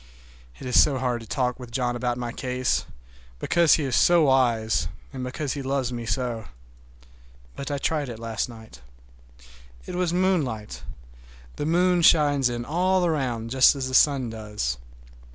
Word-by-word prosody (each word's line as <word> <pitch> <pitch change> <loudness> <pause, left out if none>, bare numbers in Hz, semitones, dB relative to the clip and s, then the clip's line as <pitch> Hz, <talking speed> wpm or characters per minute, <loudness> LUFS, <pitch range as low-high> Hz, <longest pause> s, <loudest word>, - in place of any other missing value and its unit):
It - - -10
is 125 - +5
so 145 -3 +2
hard 125 -2 -1
to 115 - -12
talk 125 +2 -1
with 125 -2 -9
John 120 0 -1
about 120 0 -2
my 120 -1 -4
case, 125 0 -2 0.5
because 170 - +3
he 155 - -2
is 130 -3 -1
so 175 -2 +5
wise, 120 -8 +2 0.3
and 130 -1 -5
because 130 +2 -3
he 145 - -5
loves 135 -2 -2
me 120 -1 -5
so. 115 0 -2 1.1
But 140 - -6
I 145 - -2
tried 145 -1 -1
it 115 - -7
last 115 0 -3
night. 110 - -13 1.0
It - - -7
was 180 -1 0
moonlight. 165 - -1 0.8
The 145 - -2
moon 180 +1 +2
shines 145 -5 +4
in 120 0 -4
all 180 +4 +1
around, 125 -8 -2
just 130 +2 +5
as 130 -2 -3
the - - -7
sun 130 -4 +3
does. 105 - -4
130 Hz, 165 wpm, -25 LUFS, 120-150 Hz, 1.1 s, is